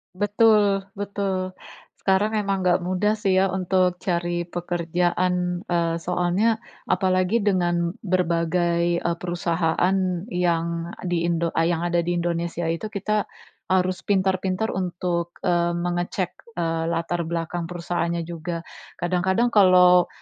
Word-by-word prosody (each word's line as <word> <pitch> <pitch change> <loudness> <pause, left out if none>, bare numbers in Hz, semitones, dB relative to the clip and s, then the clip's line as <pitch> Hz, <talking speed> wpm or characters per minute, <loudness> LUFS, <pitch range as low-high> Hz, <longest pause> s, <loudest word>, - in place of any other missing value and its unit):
Betul, 205 -1 +3
betul. 195 -2 -2 0.5
Sekarang 195 +2 +2
memang 200 -3 -1
nggak 180 0 +3
mudah 185 +4 0
sih, 195 -3 +2
ya, 190 0 +3
untuk 185 -1 +1
cari 175 -1 -1
pekerjaan. 175 +1 -1
Eee, 170 -1 +1
soalnya, 180 +6 +1 0.3
apalagi 185 +3 +2
dengan 175 -4 +1
berbagai, 170 -1 +1
eee, 170 - 0
perusahaan 175 +1 0 0.4
yang 170 -1 -1
di 175 -2 0
Indo 170 -1 0
ah, 165 0 +1
yang 170 -1 0
ada 175 0 +1
di 175 +1 0
Indonesia 170 0 -2
itu, 165 +6 -3
kita 210 0 -1 0.4
harus 185 0 +1
pintar-pintar 190 +1 +1
untuk, 175 -2 -2
eee, 175 -1 +1
mengecek, 175 +1 -2 0.2
eee, 165 -1 -1
latar 170 0 -1
belakang 170 0 -3
perusahaannya 170 -1 -2
juga. 170 0 -5 0.3
Kadang-kadang 190 +7 +1
kalau 180 -3 +6
175 Hz, 120 wpm, -24 LUFS, 170-190 Hz, 0.5 s, kalau